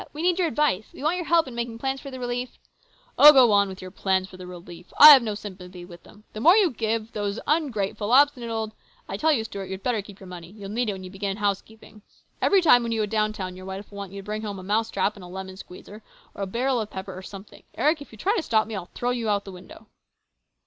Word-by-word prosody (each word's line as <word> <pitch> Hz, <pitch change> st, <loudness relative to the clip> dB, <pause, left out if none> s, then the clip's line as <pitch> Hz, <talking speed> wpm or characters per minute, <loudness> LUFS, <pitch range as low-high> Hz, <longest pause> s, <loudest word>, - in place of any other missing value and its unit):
We 305 Hz, +2 st, -5 dB
need 360 Hz, 0 st, +2 dB
your 355 Hz, -, +2 dB
advice. 220 Hz, -, 0 dB
We -, -, -10 dB
want 320 Hz, +4 st, +1 dB
your 350 Hz, -, -4 dB
help 330 Hz, -3 st, +3 dB
in 255 Hz, -, -8 dB
making 235 Hz, -1 st, -4 dB
plans 265 Hz, +2 st, -3 dB
for 275 Hz, -, -8 dB
the 260 Hz, -1 st, -8 dB
relief 245 Hz, 0 st, -4 dB, 0.3 s
" -, -, -24 dB
Oh, 295 Hz, -, +11 dB
go 260 Hz, -5 st, +6 dB
on 200 Hz, -1 st, +3 dB
with 190 Hz, -1 st, -9 dB
your 185 Hz, -, -9 dB
plans 190 Hz, -1 st, 0 dB
for 185 Hz, -, -14 dB
relief! 175 Hz, -1 st, -11 dB
I 300 Hz, -, +12 dB
have 280 Hz, -3 st, +10 dB
no 215 Hz, -3 st, -3 dB
sympathy 185 Hz, -4 st, -10 dB
with 175 Hz, -1 st, -13 dB
them! 210 Hz, -, -18 dB
The 215 Hz, -, -6 dB
more 340 Hz, -, +6 dB
you 385 Hz, -7 st, +4 dB
give 225 Hz, -1 st, -2 dB
those 205 Hz, -1 st, -3 dB
ungrateful, 230 Hz, -9 st, -1 dB
obstinate 265 Hz, -3 st, +4 dB
old 220 Hz, -1 st, -3 dB, 0.4 s
I -, -, -5 dB
tell 315 Hz, +1 st, +2 dB
you, 245 Hz, -7 st, +1 dB
Stuart, 200 Hz, -3 st, -7 dB
you'd 190 Hz, 0 st, -7 dB
better 240 Hz, -4 st, 0 dB
keep 200 Hz, -1 st, -14 dB
your 190 Hz, -, -12 dB
money. 175 Hz, -2 st, -10 dB
You'll 200 Hz, 0 st, -10 dB
need 230 Hz, +2 st, -1 dB
it -, -, -1 dB
when 190 Hz, -1 st, -9 dB
you 185 Hz, -, -9 dB
begin 195 Hz, 0 st, -4 dB
housekeeping. 210 Hz, +1 st, -4 dB, 0.4 s
Every 390 Hz, -2 st, +4 dB
time 245 Hz, -7 st, +6 dB
when 235 Hz, -1 st, -3 dB
you 220 Hz, -1 st, 0 dB
go -, -, +1 dB
down 215 Hz, 0 st, 0 dB
town 185 Hz, -3 st, -6 dB
your 185 Hz, +1 st, -10 dB
wife 195 Hz, +2 st, -8 dB
will 200 Hz, -, -9 dB
want 200 Hz, -2 st, -7 dB
you 200 Hz, -, -8 dB
to -, -, -19 dB
bring 215 Hz, +1 st, -4 dB
home 205 Hz, -2 st, -5 dB
a 185 Hz, -, -9 dB
mouse 220 Hz, +4 st, 0 dB
trap 200 Hz, +2 st, 0 dB
and 195 Hz, -, -12 dB
a -, -, -10 dB
lemon 190 Hz, +1 st, -8 dB
squeezer, 200 Hz, +3 st, -12 dB, 0.3 s
or -, -, -9 dB
a 195 Hz, -, -2 dB
barrel 245 Hz, +4 st, 0 dB
of 215 Hz, -, -6 dB
pepper 190 Hz, -1 st, -7 dB
or 185 Hz, -, -8 dB
something. 195 Hz, +1 st, -12 dB
Eric, 305 Hz, 0 st, +1 dB
if 285 Hz, -, -11 dB
you 220 Hz, -, -13 dB
try 400 Hz, -, 0 dB
to 410 Hz, -, 0 dB
stop 220 Hz, -8 st, +1 dB
me, 225 Hz, -, -8 dB
I'll 180 Hz, -3 st, -6 dB
throw 245 Hz, 0 st, -1 dB
you 240 Hz, -2 st, -2 dB
through 205 Hz, -1 st, +1 dB
the 195 Hz, -, -10 dB
window." 185 Hz, +4 st, -13 dB
215 Hz, 275 wpm, -25 LUFS, 190-245 Hz, 0.4 s, I